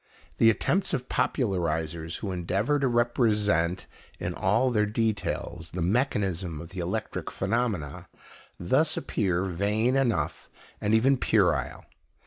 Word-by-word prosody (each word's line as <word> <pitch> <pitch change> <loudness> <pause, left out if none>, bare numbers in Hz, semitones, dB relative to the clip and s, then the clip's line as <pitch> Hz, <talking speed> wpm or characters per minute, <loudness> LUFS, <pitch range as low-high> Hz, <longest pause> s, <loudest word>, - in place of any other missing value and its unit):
The 115 - +7
attempts 185 - +1
of 125 - -5
popularizers 85 - -1
who 100 - -3
endeavour 95 +10 0
to 135 - +2
represent, 105 -8 +1 0.3
in - - -3
all 115 +7 +2
their 105 -3 +2
details, 105 -6 -2
the 90 - -1
mechanism 95 - 0
of 85 +1 -9
the 95 - -7
electric 90 +2 -3
phenomena, 100 - -2 0.5
thus 150 - +2
appear 95 -8 0
vain 105 +7 0
enough, 135 -4 0 0.3
and 105 +1 +2
even 135 +5 +4
puerile. - - +1
105 Hz, 120 wpm, -27 LUFS, 90-120 Hz, 0.5 s, The